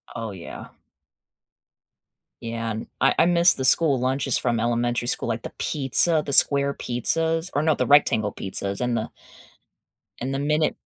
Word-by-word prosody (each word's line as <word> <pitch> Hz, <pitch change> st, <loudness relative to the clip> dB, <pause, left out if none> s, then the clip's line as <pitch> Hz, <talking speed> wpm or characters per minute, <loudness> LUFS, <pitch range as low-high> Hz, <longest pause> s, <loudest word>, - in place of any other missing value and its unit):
Oh 115 Hz, -2 st, -6 dB
yeah. 90 Hz, -3 st, -10 dB, 1.7 s
Yeah, 115 Hz, 0 st, -5 dB
an 110 Hz, +1 st, -7 dB
I 135 Hz, 0 st, +2 dB
I -, -, +4 dB
missed 175 Hz, 0 st, +4 dB
the 130 Hz, -, -2 dB
school 140 Hz, -1 st, +4 dB
lunches 130 Hz, +1 st, +1 dB
from 120 Hz, -2 st, -1 dB
elementary 120 Hz, +1 st, -2 dB
school, 120 Hz, -, -1 dB
like 115 Hz, 0 st, -4 dB
the -, -, -7 dB
pizza, 155 Hz, +3 st, +3 dB
the 140 Hz, -, -4 dB
square 140 Hz, +1 st, +3 dB
pizzas, 160 Hz, +8 st, -2 dB
or 145 Hz, -, 0 dB
no, 155 Hz, -1 st, +1 dB
the -, -, -2 dB
rectangle 110 Hz, -8 st, +2 dB
pizzas 100 Hz, +2 st, -4 dB
and 120 Hz, -1 st, -1 dB
the 110 Hz, -, -4 dB, 1.1 s
And 130 Hz, +2 st, -4 dB
the 135 Hz, -, -3 dB
minute 150 Hz, +2 st, -1 dB
130 Hz, 160 wpm, -22 LUFS, 115-150 Hz, 1.7 s, I